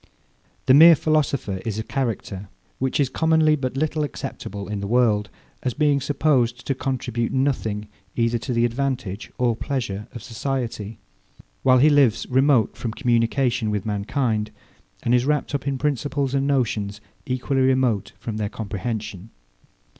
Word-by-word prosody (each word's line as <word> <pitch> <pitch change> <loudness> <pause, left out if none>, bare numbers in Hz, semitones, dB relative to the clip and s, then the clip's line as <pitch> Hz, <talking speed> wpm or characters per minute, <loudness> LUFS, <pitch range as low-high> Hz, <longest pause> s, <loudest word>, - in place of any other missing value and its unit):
The 130 - +6
mere 165 +4 +9
philosopher 140 -10 0
is 110 -3 -3
a 110 - -2
character, 110 -7 -3 0.3
which 130 +2 0
is 140 - +3
commonly 160 +2 +3
but 130 -2 -3
little 155 +1 0
acceptable 100 -7 -6
in 105 -1 -3
the 100 - -4
world, 110 -3 +2 0.3
as 125 - -2
being 145 -2 +2
supposed 130 -4 +1
to 135 - 0
contribute 125 -3 -2
nothing 120 -6 -1 0.3
either 115 0 +1
to 125 - -5
the 120 0 +2
advantage 120 -5 -3
or 120 -2 +2
pleasure 115 -6 -3
of 120 -4 -9
society; 115 -3 -4 0.6
while 130 -1 +5
he 150 +4 +5
lives 140 -7 +3
remote 130 -2 +3
from 115 -3 -4
communication 120 -1 +1
with 105 -2 -2
mankind, 110 +1 -1 0.5
and 120 - +1
is 125 0 +3
wrapped 150 0 0
up 140 -1 -2
in 135 -1 0
principles 140 -1 -1
and 140 0 +1
notions 110 -7 0 0.3
equally 130 +1 0
remote 130 -6 +1
from 110 -2 -5
their 105 -1 -2
comprehension. 105 -1 -5
125 Hz, 150 wpm, -23 LUFS, 110-140 Hz, 0.6 s, mere